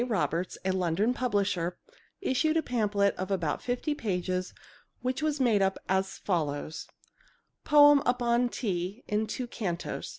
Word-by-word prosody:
Roberts, 185 -6 -1
a 190 - +2
London 185 +5 +1
publisher, 200 -8 0 0.4
issued 315 -1 +1
a 320 - +1
pamphlet 210 -4 +1
of 185 +1 -4
about 170 -6 -1
fifty 250 +5 -1
pages 185 -7 -2 0.5
which 255 +2 -1
was 305 -1 0
made 230 -6 +3
up 190 0 +1
as 190 +1 0
follows: 155 -5 -2 0.8
Poem 290 -1 +7
upon 245 0 +2
Tea 195 0 -3
in 210 +1 0
Two 250 +4 -3
Cantos 185 -7 -4
205 Hz, 135 wpm, -29 LUFS, 185-250 Hz, 0.8 s, Poem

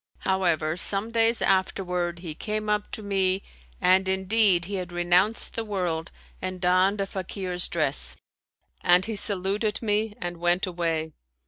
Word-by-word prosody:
However, 170 -5 +1
some 200 +4 -2
days 230 0 +3
afterward, 180 -2 0
he 160 - -4
came 215 +5 -3
up 210 0 -1
to 215 - -5
me, 195 -1 +1 0.4
and 190 +1 +3
in 190 0 0
deed 200 -4 +4
he 200 - -7
had 180 -1 -5
renounced 175 +5 +2
the 230 - -2
world 180 -6 -2 0.3
and 185 0 -4
donned 185 +3 +2
a 195 - 0
Fakir's 185 -2 -3
dress; - - -1 0.7
and 180 +1 +4
he 225 - -4
saluted 205 +2 +1
me 210 -1 -1
and 175 0 -4
went 175 +3 +2
away. 165 -3 -2
190 Hz, 150 wpm, -26 LUFS, 175-205 Hz, 0.7 s, deed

